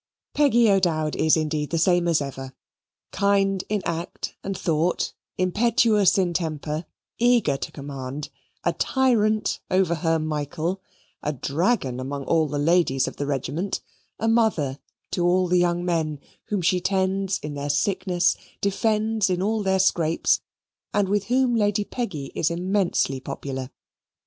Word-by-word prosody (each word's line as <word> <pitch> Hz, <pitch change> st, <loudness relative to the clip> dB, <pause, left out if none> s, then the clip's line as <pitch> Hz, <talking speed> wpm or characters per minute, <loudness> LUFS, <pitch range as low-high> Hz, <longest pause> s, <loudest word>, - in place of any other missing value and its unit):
Peggy 240 Hz, -6 st, +4 dB
O'Dowd 170 Hz, -6 st, +2 dB
is 160 Hz, +1 st, +3 dB
indeed 155 Hz, -1 st, -1 dB
the 165 Hz, -, -1 dB
same 175 Hz, +1 st, +3 dB
as 160 Hz, -4 st, +2 dB
ever, 135 Hz, -1 st, -7 dB, 0.6 s
kind 195 Hz, -1 st, +2 dB
in 210 Hz, -2 st, -1 dB
act 170 Hz, +1 st, -4 dB
and 195 Hz, -1 st, -3 dB
thought; 165 Hz, +1 st, 0 dB, 0.2 s
impetuous 215 Hz, +2 st, +3 dB
in 180 Hz, -3 st, +1 dB
temper; 155 Hz, -1 st, -3 dB, 0.3 s
eager 235 Hz, -, +3 dB
to -, -, -6 dB
command; 140 Hz, 0 st, -6 dB, 0.3 s
a -, -, +1 dB
tyrant 220 Hz, -5 st, +1 dB
over 185 Hz, -2 st, +2 dB
her 165 Hz, 0 st, +1 dB
Michael; 155 Hz, +4 st, -2 dB, 0.4 s
a 150 Hz, -, -1 dB
dragon 145 Hz, -, 0 dB
amongst 140 Hz, +1 st, -5 dB
all 160 Hz, -2 st, +3 dB
the 145 Hz, 0 st, -3 dB
ladies 145 Hz, -3 st, +2 dB
of -, -, -7 dB
the 145 Hz, -, -3 dB
regiment; 145 Hz, +7 st, -2 dB, 0.4 s
a 225 Hz, -, -1 dB
mother 210 Hz, -, +2 dB, 0.3 s
to 175 Hz, -, 0 dB
all 180 Hz, +1 st, +3 dB
the 180 Hz, +1 st, +3 dB
young 175 Hz, 0 st, +1 dB
men, 160 Hz, -4 st, -1 dB, 0.3 s
whom 205 Hz, -4 st, -2 dB
she 180 Hz, +2 st, +2 dB
tends 190 Hz, 0 st, 0 dB
in 150 Hz, 0 st, -6 dB
their 145 Hz, 0 st, -4 dB
sickness, 180 Hz, +4 st, +1 dB, 0.2 s
defends 215 Hz, +1 st, +1 dB
in 180 Hz, -1 st, 0 dB
all 215 Hz, +3 st, 0 dB
their 190 Hz, -1 st, +2 dB
scrapes, 170 Hz, -4 st, +2 dB, 0.5 s
and 205 Hz, -2 st, +2 dB
with 205 Hz, 0 st, +1 dB
whom 250 Hz, +1 st, +2 dB
Lady 205 Hz, -1 st, +2 dB
Peggy 190 Hz, -, -5 dB
is 155 Hz, -, +1 dB
immensely 175 Hz, -6 st, 0 dB
popular. 130 Hz, 0 st, -5 dB
175 Hz, 145 wpm, -24 LUFS, 150-200 Hz, 0.6 s, Peggy